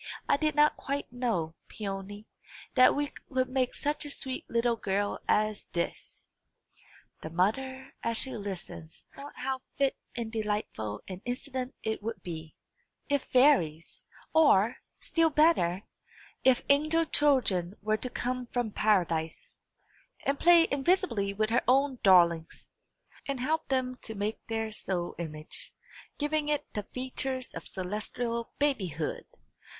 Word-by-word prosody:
I - - +5
did 305 +1 0
not 300 0 +5
quite 280 -2 -4
know, 225 -11 -1
Peony, 205 0 -6 0.5
that 255 -1 +6
we 290 0 -1 0.2
could 260 -1 +1
make 255 -1 0
such 295 +1 -2
a 295 - -7
sweet 260 -2 -5
little 235 0 +2
girl 205 -1 -1
as 215 -1 +1
this." 170 -1 -4 1.0
The 160 - -5
mother, 260 +10 -1
as 230 -1 -1
she 265 - -3
listened, 190 -6 -6 0.3
thought 280 +1 -9
how 260 +1 -2
fit 275 -1 +2 0.2
and 230 -2 -3
delightful 210 - -3
an 185 -1 -7
incident 255 +1 -4
it 220 -1 -2
would 225 +2 -5
be, 160 -3 -7 0.5
if 285 -2 +1
fairies, 215 - +3 0.3
or, 245 -9 +5 0.2
still 330 -1 +2
better, 285 - +3 0.6
if 260 -2 +4
angel 310 +4 +4
children 230 - +2
were 215 +1 +2
to 255 - -3
come 250 0 -3
from 240 -2 -1
paradise, 175 -7 0 0.7
and 275 0 +1
play 340 -1 +7
invisibly 280 - +2
with 215 +2 -1
her 240 - +4
own 265 0 +3
darlings, 170 -4 +4 0.6
and 275 -2 -2
help 310 +5 0
them 255 -1 0
to 220 - -5
make 210 +2 -2
their 225 -1 -2
snow 180 -4 -3
image, 155 -2 -7 0.4
giving 300 0 0
it 295 -1 0
the 210 -1 -4
features 260 0 -3
of - - -7
celestial 220 +5 -3
babyhood! 190 - -1
235 Hz, 135 wpm, -30 LUFS, 195-275 Hz, 1.0 s, play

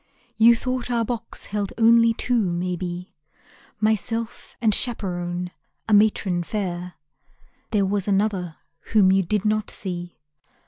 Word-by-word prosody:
You 230 +1 +6
thought 255 +1 -3
our 235 -2 +1
box 235 0 -4
held 205 -1 -3
only 230 0 +5
two, 240 +1 0
maybe 180 0 -4 0.7
Myself 220 +2 -2
and 220 -3 +2
chaperon, 180 -7 -1 0.4
a 220 - +1
matron 205 -4 +3
fair. 180 -2 -4 0.7
There 205 -3 +2
was 200 0 -1
another 195 -4 0 0.4
whom 195 -3 +6
you 195 0 +4
did 205 +3 -1
not 215 0 0
see. 175 -2 -5
205 Hz, 125 wpm, -23 LUFS, 180-225 Hz, 0.7 s, You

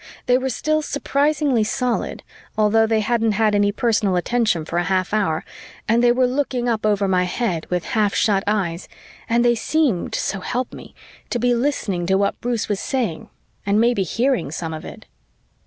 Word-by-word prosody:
They 250 0 +3
were 265 0 -2
still 310 +5 0
surprisingly 285 -3 +1
solid, 250 +2 -2 0.3
although 220 +1 +3
they 220 -1 +2
hadn't 225 0 +1
had 215 +1 +2
any 205 0 +3
personal 210 -3 +1
attention 195 -3 0
for 170 +1 -1
a 175 - -1
half 185 0 0
hour, 180 -7 0 0.4
and 230 +2 +3
they 240 - +6
were 255 +1 +3
looking 250 -1 -1
up 220 -2 0
over 205 -1 +1
my 180 -1 +2
head 180 -3 -2
with 180 -1 -1
half 210 -2 0
shut 200 -3 +2
eyes 190 -5 -1 0.4
and 235 +1 +2
they 240 - +5
seemed, 245 - 0
so 195 - -2
help 245 +6 -3
me, - - -11 0.3
to - - -1
be 245 +1 +2
listening 235 -9 -1
to 190 - +3
what 200 0 -1
Bruce 240 -2 -1
was 205 -2 -1
saying 235 - -2 0.3
and 200 +1 +2
maybe 235 -2 +2
hearing 230 - 0
some 160 +1 -5
of 155 - -7
it. - - -10
220 Hz, 185 wpm, -21 LUFS, 195-245 Hz, 0.4 s, they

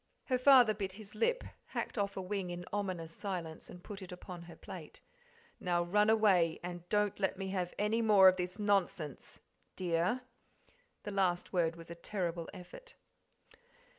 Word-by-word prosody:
Her 255 -2 +1
father 255 -4 +7
bit 195 -2 -4
his 210 0 -10
lip, 355 - +1 0.3
hacked - - -2
off 200 -2 -1
a 190 - -2
wing 190 -1 -3
in 175 0 -5
ominous 185 -5 -2
silence, 170 -4 -5
and 180 0 -11
put 205 -1 -8
it 185 - -9
upon 180 -1 -8
her 170 - -11
plate. - - -10 0.6
"Now 175 -1 +1
run 210 +5 +3
away, 195 -7 +4
and 175 0 -7
don't 210 -1 +1
let 190 -1 0
me 190 0 -4
have 180 -2 -2
any 215 +3 +1
more 205 -4 +7
of 185 - +7
this 180 +2 -3
nonsense, 195 - -1 0.3
dear." 180 +7 0 0.8
The 205 - -5
last 185 -3 0
word 165 -2 +2
was 165 0 -11
a - - -3
terrible 170 -1 -3
effort. 475 - -12
190 Hz, 165 wpm, -34 LUFS, 175-210 Hz, 0.8 s, father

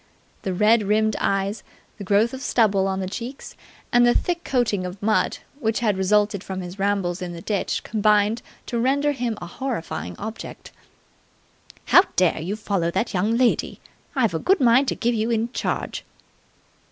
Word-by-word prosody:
The 190 - -3
red 215 +5 +4
rimmed 215 +1 +1
eyes, 195 +1 0 0.4
the - - -5
growth 205 +5 +2
of 265 - -6
stubble 200 -7 +2
on 190 0 -2
the 185 - -3
cheeks, 240 +7 -7 0.4
and 240 0 +6
the 240 0 +4
thick 345 -1 -1
coating 235 -7 0
of 180 +2 -6
mud 215 +2 +1 0.2
which 225 -3 -1
had 210 -4 +2
resulted 205 +1 +1
from 190 -1 -5
his 180 +2 -8
rambles 195 -3 0
in 175 -1 -4
the 170 - -8
ditch 205 -3 -1
combined 210 +1 +2 0.2
to 235 - -2
render 280 +4 +2
him 245 -5 -2
a - - -7
horrifying 230 0 -4
object. 220 +2 -8 1.1
"How - - +7
dare 180 -3 +2
you 185 +6 -3
follow 200 -5 -1
that 190 +7 -1
young 210 +5 +1
lady? 250 -1 +1 0.4
I've 230 -9 +2
a 160 - -1
good 385 - +3
mind 255 +2 +4
to - - 0
give 240 0 0
you 220 0 0
in 230 0 0
charge!" - - -3
215 Hz, 175 wpm, -23 LUFS, 190-235 Hz, 1.1 s, How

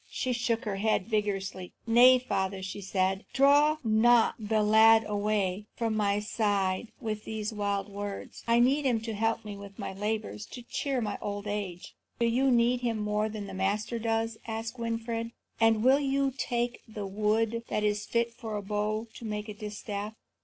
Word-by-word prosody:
She 255 -1 -2
shook 230 -1 -1
her 200 -2 -2
head 215 -2 +1
vigorously. 195 -4 -2
"Nay, 245 +3 +7
father," 195 -6 -2
she 190 +2 -5
said, 190 0 0
"draw 290 +3 +5
not 225 +1 +4
the 215 0 +1
lad 220 +1 +6
away 205 -1 -1
from 225 -2 -1
my 205 -1 +1
side 205 -1 0
with 215 -3 -4
these 220 0 -4
wild 200 -2 -1
words. 205 0 -7
I 230 0 +4
need 270 +5 +3
him 245 -4 +2
to 225 0 -4
help 225 +1 0
me 205 -1 -6
with 200 -1 -11
my - - -5
labours, 210 +1 -3
to 245 - -9
cheer 265 +1 -2
my 210 -2 -3
old 205 0 -4
age." 200 -4 -4 0.2
"Do 235 - +1
you 250 +4 +2
need 240 0 +3
him 235 -2 0
more 210 0 0
than 210 -1 -6
the 195 - -8
Master 205 +5 -1
does?" 225 0 -1
asked 225 +2 -4
Winfried; 230 0 -3 0.3
"and 225 -1 +4
will 265 +3 +6
you 275 -1 +1
take 240 -2 -2
the 215 -2 -6
wood 215 +3 0
that 210 - -1
is 210 0 0
fit 235 0 0
for 220 -2 -5
a 205 - -5
bow 210 +2 -1
to - - -11
make 210 -1 -4
a - - -4
distaff?" 210 0 -6
215 Hz, 180 wpm, -29 LUFS, 205-230 Hz, 0.3 s, Nay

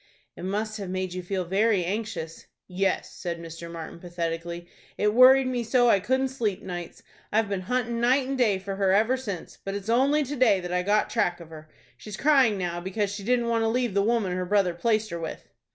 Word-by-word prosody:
"It - - -7
must 215 +3 -2
have 195 -2 -5
made 185 -1 -3
you 185 - -4
feel 185 0 -3
very 195 +1 +2
anxious." 185 -5 -4 0.2
"Yes," 190 +1 -1
said 175 -3 -4
Mr. 165 0 -8
Martin, 165 0 -8
pathetically. 170 0 -4 0.3
"It 210 0 +2
worried 260 +2 +7
me 250 -2 -1
so 245 +1 +3
I 200 - +4
couldn't 260 +6 0
sleep 225 -7 -2
nights. 175 -2 -7 0.3
I've 220 0 +2
been 200 -2 -2
hunting 240 -2 0
night 255 +2 +3
and 270 - -2
day 225 -7 +2
for 195 +1 -6
her 195 -1 +2
ever 220 +6 +3
since, 205 -10 -6
but 195 0 -4
it's 200 +1 -6
only 275 +6 +3
to 285 +2 -5
day 235 -7 +4
that 180 0 -5
I 180 - +2
got 210 +3 +1
track 180 -6 0
of 165 -1 -12
her. 155 -1 -11 0.3
She's 210 -2 -8
crying 270 -8 +4
now 175 -2 -3
because 195 +2 -2
she 205 -1 -6
didn't 240 +2 +1
want 230 -1 +1
to 225 - +2
leave 240 -1 0
the 200 - +3
woman 220 -3 +1
her 180 0 -2
brother 190 -1 +2
placed 215 +4 0
her 170 - -4
with." 165 -1 -7
200 Hz, 220 wpm, -26 LUFS, 180-235 Hz, 0.3 s, worried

